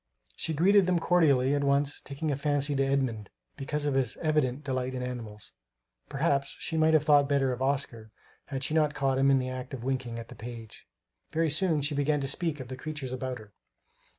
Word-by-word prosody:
She 160 - -3
greeted 190 +4 +5
them 180 -1 +3
cordially, 145 -7 +3
at 145 0 +1
once 140 +1 +1
taking 145 +2 -4
a - - 0
fancy 145 0 0
to 135 - +2
Edmund 130 -7 -1 0.3
because 150 +2 -3
of 145 - +1
his 130 -4 0
evident 150 -4 0
delight 130 -2 -2
in 125 - -3
animals. 115 -5 -7 0.6
Perhaps 140 -1 0
she 165 - -4
might 160 0 +4
have 155 - +4
thought 145 -2 +4
better 135 -2 +2
of 125 - -7
Oscar, 130 -5 -2 0.4
had 135 -2 -4
she 150 - -1
not 150 -2 +2
caught 135 -2 +1
him 135 +1 +4
in 135 - +5
the 130 0 -2
act 130 +1 -6
of 120 - -9
winking 130 -3 -2
at 115 0 -8
the - - -9
page. 115 -1 -10 0.4
Very 160 -1 0
soon 155 -2 +2
she 145 +1 0
began 145 +1 +1
to 135 - -2
speak 155 +1 -1
of 130 - -7
the 130 - -6
creatures 135 -1 -6
about 130 -1 -3
her. 105 -3 -15
140 Hz, 210 wpm, -29 LUFS, 130-150 Hz, 0.6 s, greeted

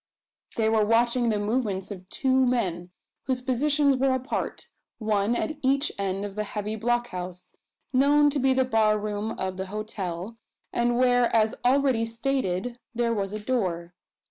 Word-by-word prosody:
They 220 -1 +1
were 220 -1 +3
watching 235 +2 +2
the 215 - +1
movements 205 -3 -1
of 185 -2 -9
two 265 -1 +2
men, 190 -9 0 0.4
whose 255 -1 -1
positions 280 +2 +2
were 265 0 +2
apart 260 +3 -4 0.3
one 215 0 +1
at 310 +4 -2
each 275 +2 +2
end 195 0 -1
of 200 - -6
the 210 +1 -2
heavy 210 +1 -4
blockhouse, 210 -6 -3 0.4
known 290 +3 +5
to 285 - -1
be 265 0 +3
the 260 0 +3
bar 220 -3 +3
room 210 +1 -3
of 185 0 -3
the 190 0 -4
hotel; 205 -1 -5 0.4
and 240 0 +1
where, 245 -1 +4
as 220 -1 +3
already 255 -3 +3
stated, 235 -2 -2 0.2
there 235 0 +1
was 195 -3 -2
a 215 - -4
door. 185 -7 -2
225 Hz, 160 wpm, -26 LUFS, 205-255 Hz, 0.4 s, known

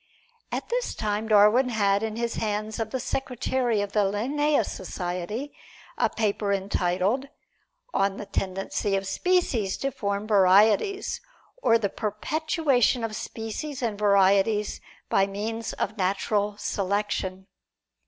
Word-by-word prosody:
At - - -4
this - - -1
time 215 0 -2
Darwin 215 +4 +5
had 200 -3 +2
in 220 -1 -3
the 235 +1 0
hands 215 -1 -3
of 225 -1 -2
the 260 - -3
secretary 250 -3 -1
of 205 -1 -3
the 210 - +1
Linnæus 240 +7 +1
Society 185 +8 -4 0.4
a - - +2
paper 205 -2 -1
entitled, 195 +5 0 0.7
"On 195 0 +1
the 210 - -6
Tendency 195 +1 -2
of 195 0 -1
Species 235 - +1
to 275 - -2
Form 200 -5 -2
Varieties, 210 - +3 0.4
or 230 - +5
the 215 -3 0
Perpetuation 250 - 0
of 220 -1 -3
Species 250 +7 -5
and 215 -3 -2
Varieties 200 +1 +3 0.3
by 195 0 +3
Means 220 +3 -4
of 215 - -3
Natural 200 +2 0
Selection." 195 -2 -2
210 Hz, 125 wpm, -26 LUFS, 200-235 Hz, 0.7 s, Darwin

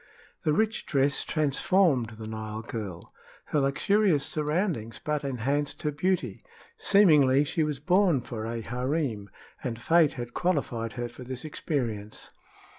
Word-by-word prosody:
The 155 - +1
rich 220 +7 0
dress 140 -1 +2
transformed 150 - +2
the 110 - -7
Nile 110 0 -5
girl. 100 -7 -7 0.3
Her 150 - 0
luxurious 150 +3 +2
surroundings 150 - -2
but 150 -1 -1
enhanced 140 +4 -1
her 150 - +1
beauty. 145 - -1 0.3
Seemingly 150 -9 +5
she 150 +3 -1
was 150 -3 -1
born 175 -2 +3
for 115 -2 -6
a 115 0 -3
harem, 125 -3 -2 0.3
and 120 -3 -3
fate 160 +3 +4
had 120 -1 -6
qualified 125 - -1
her 120 +3 -3
for 120 +2 -11
this 130 +2 -6
experience. 115 -9 -3
140 Hz, 135 wpm, -28 LUFS, 115-155 Hz, 0.3 s, Seemingly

